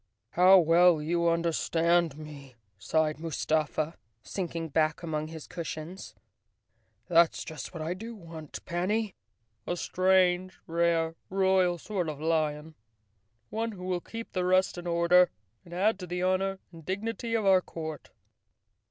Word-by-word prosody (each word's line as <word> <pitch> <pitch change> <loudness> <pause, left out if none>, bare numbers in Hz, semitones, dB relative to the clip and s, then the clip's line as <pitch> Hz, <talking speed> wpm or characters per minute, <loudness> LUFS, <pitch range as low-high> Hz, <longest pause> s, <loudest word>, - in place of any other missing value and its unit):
"How 185 +5 +7
well 170 0 +5
you 170 +2 +1
understand 170 -1 +1
me," 145 -4 -11 0.2
sighed 155 +9 0
Mustafa, 155 0 -1 0.3
sinking 165 - -4
back 155 +2 +1
among 155 -2 -2
his 160 -1 -9
cushions. 170 +1 -7 0.9
"That's 170 -1 +4
just 150 -6 -7
what 160 -2 -6
I 165 +3 -2
do 225 +5 -8
want, 165 -6 -10
Panny—a 175 - -4
strange, 185 0 +2
rare, 165 -1 +1 0.2
royal 190 -2 +2
sort 180 -1 -3
of 150 -2 -6
lion; 155 -1 -1 0.8
one 225 0 -2
who 180 -2 -9
will 180 -1 -1
keep 230 +4 -8
the 185 - -1
rest 185 +1 +3
in 175 - -7
order 170 +1 +5 0.3
and 170 - -16
add 200 +4 +1
to 180 - -7
the 180 +1 -3
honor 190 +1 +1
and 165 -2 -13
dignity 225 +6 -3
of 220 -2 0
our 190 -1 +6
court." 160 -3 -7
170 Hz, 135 wpm, -29 LUFS, 160-185 Hz, 0.9 s, How